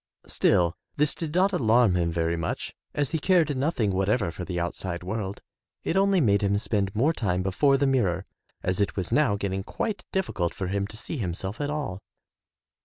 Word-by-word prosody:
Still, 85 -2 +2 0.2
this 150 0 +2
did 160 -1 -5
not 195 +2 +3
alarm 120 - +4
him 85 -1 +1
very 85 0 0
much 85 -1 -3 0.2
as 145 -2 0
he 160 - 0
cared 165 -3 +3
nothing 130 -6 +1
whatever 95 +1 +1
for 90 - -6
the 90 -1 -3
outside 85 0 -3
world. 95 +1 -4 0.4
It - - -1
only 195 0 +4
made 100 -9 +3
him 100 0 +2
spend 100 -1 -1
more 140 +9 +3
time 95 - -1
before 135 +9 +3
the 140 - +2
mirror, 100 -9 +1 0.4
as 90 +2 0
it 100 - 0
was 95 -3 -3
now 145 -9 +3
getting 95 -1 -2
quite 215 - -3
difficult 100 - -1
for 95 - -3
him 100 0 -1
to 110 - -9
see 150 - -5
himself 95 - -3
at 145 - -1
all. 145 -11 -3
100 Hz, 190 wpm, -26 LUFS, 95-145 Hz, 0.4 s, alarm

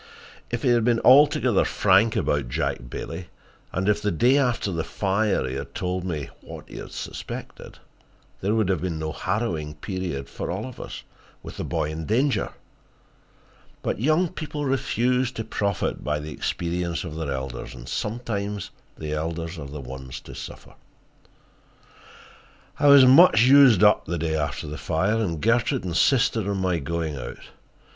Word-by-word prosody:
If - - -3
he 130 - +3
had 120 -2 +4
been 120 0 +3
altogether 130 -4 +5
frank 105 +3 +3
about 70 -4 0
Jack - - -2
Bailey, 85 +7 -6 0.4
and 95 +2 -2
if 105 0 +2
the 105 - 0
day 120 - +3
after 125 -7 +1
the 85 -2 -2
fire 100 -4 0
he 65 - -4
had 70 - -6
told 90 0 -2
me 80 -6 -3
what - - -10
he - - -10
suspected, - - -8 0.6
there 100 +3 +1
would 110 -4 +2
have 95 -4 +1
been 85 -3 -2
no 80 0 -3
harrowing 85 -5 -2
period 85 -4 -4
for - - -6
all 95 +5 -3
of 130 -2 -9
us, - - -7 0.4
with - - -9
the - - -3
boy 75 - -2
in 80 0 -5
danger. 125 +1 +1 1.3
But - - -2
young 155 +6 +3
people 155 -4 -5
refuse 130 -1 +1
to 115 - -4
profit 100 -3 -2
by 75 0 0
the 75 +1 -7
experience 85 +4 -2
of 85 -3 -7
their 80 -3 -3
elders, 65 -2 -5
and - - -11
sometimes 105 -3 -3 0.3
the 75 -1 -4
elders 80 +2 -3
are 70 - -6
the 75 +1 -7
ones 65 0 -8
to - - -11
suffer. - - -9 2.1
I 145 - +4
was 140 -2 +9
much 130 -3 +7
used 130 -5 +7
up - - +5
the 85 - -2
day 80 0 -1
after 75 -1 -2
the 75 -1 -6
fire, 95 +8 0
and 90 -8 -1
Gertrude 115 +1 +1
insisted 110 - +2
on 100 -1 -1
my 90 -3 0
going 80 0 -3
out. 65 - -7
95 Hz, 165 wpm, -24 LUFS, 80-115 Hz, 2.1 s, was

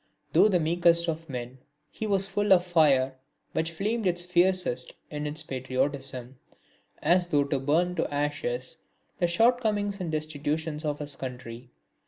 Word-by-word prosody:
Though - - +6
the 185 -4 +2
meekest 170 +1 +3
of 165 0 -3
men, 125 0 -6 0.3
he 220 - -4
was 195 -2 +1
full 205 +1 -1
of 180 -1 +4
fire 145 -7 +3 0.4
which 160 +1 0
flamed 210 +6 -1
its 175 0 +2
fiercest 180 -7 +1 0.2
in 150 -1 -4
his 150 +2 -2
patriotism, 130 -1 -3 0.6
as 175 +3 +3
though 145 -4 +3
to 140 -1 -1
burn 160 +6 +1
to - - -1
ashes 145 -1 -2 0.4
the 175 - +3
shortcomings 210 -1 +1
and 170 -3 -3
destitution 155 0 -2
of 145 -1 -1
his 145 -1 -7
country. 125 -2 -8
160 Hz, 150 wpm, -27 LUFS, 140-180 Hz, 0.6 s, Though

